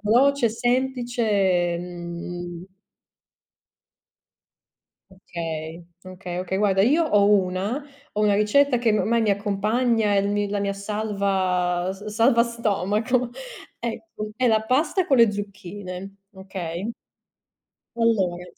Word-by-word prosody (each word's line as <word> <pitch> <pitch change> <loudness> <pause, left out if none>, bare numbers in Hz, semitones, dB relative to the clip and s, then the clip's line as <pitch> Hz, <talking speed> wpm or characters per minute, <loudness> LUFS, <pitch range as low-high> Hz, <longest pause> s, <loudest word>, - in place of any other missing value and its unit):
veloce, 250 +4 +4
è - - +3
semplice 245 +1 -1
e, 180 -4 +2
mhmm 175 0 -7 2.4
Okay, 165 -3 -6 0.2
okay, 180 -1 -7
okay, 190 +1 -2
guarda, 195 -2 +3
io 290 +10 +4
ho 205 -1 +4
una 195 +6 +1 0.3
ho 210 - -1
una 210 -1 +3
ricetta 245 +6 +3
che 235 -2 +2
ormai 230 +2 +1
mi 215 - +2
accompagna, 210 +3 +1
è - - +3
il 200 0 +1
mi 205 0 0
la 205 - -1
mia 200 0 -1
salva 195 -3 -1
s 195 +2 -11
salva 230 +3 +3
stomaco. 235 +1 0 0.5
Ecco, 225 -2 -5
è 255 - +1
la 220 -2 +4
pasta 300 - +1
con 270 - +3
le 230 -3 +6
zucchine, 195 -1 -7 0.2
okay? 190 +1 -5 1.0
Allora, 195 -7 +1
205 Hz, 120 wpm, -24 LUFS, 185-230 Hz, 2.4 s, le